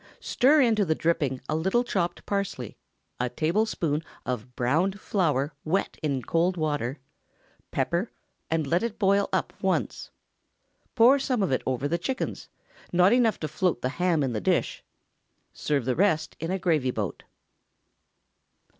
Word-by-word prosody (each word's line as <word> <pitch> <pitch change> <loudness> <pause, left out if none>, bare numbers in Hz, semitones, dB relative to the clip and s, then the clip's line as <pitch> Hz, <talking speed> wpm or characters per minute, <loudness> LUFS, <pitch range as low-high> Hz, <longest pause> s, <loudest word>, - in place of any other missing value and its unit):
Stir 285 +4 +4
into 225 -5 +3
the 160 -4 +1
dripping 145 -6 0
a 155 - 0
little 190 +9 +1
chopped 180 -7 -2
parsley, 200 - -3 0.4
a 125 0 0
tablespoonful 160 - 0 0.2
of 125 0 -4
browned 165 +11 +1
flour 150 -9 0
wet 185 +5 -1
in 140 -5 -1
cold 175 +7 +1
water; 145 -4 -1 0.7
pepper, 175 +7 -1 0.4
and 160 -1 0
let 170 +5 +1
it 230 -2 -3
boil 200 -1 +2
up - - -1
once. - - -1 0.9
Pour 255 +4 +6
some 255 -5 0
of 190 - 0
it 130 - +1
over 130 +2 0
the 170 +3 -1
chickens—not 185 -4 -1
enough 235 -4 +3
to 155 - -1
float 175 -4 -1
the 125 - +1
ham 170 -5 +3
in 130 -3 -1
the 105 - -2
dish; - - 0 0.7
serve 140 -5 -1
the 125 -1 0
rest 180 -3 +1
in 165 - -3
a 190 - 0
gravy 160 -8 +1
boat. 105 -6 -3
165 Hz, 145 wpm, -26 LUFS, 140-200 Hz, 0.9 s, Pour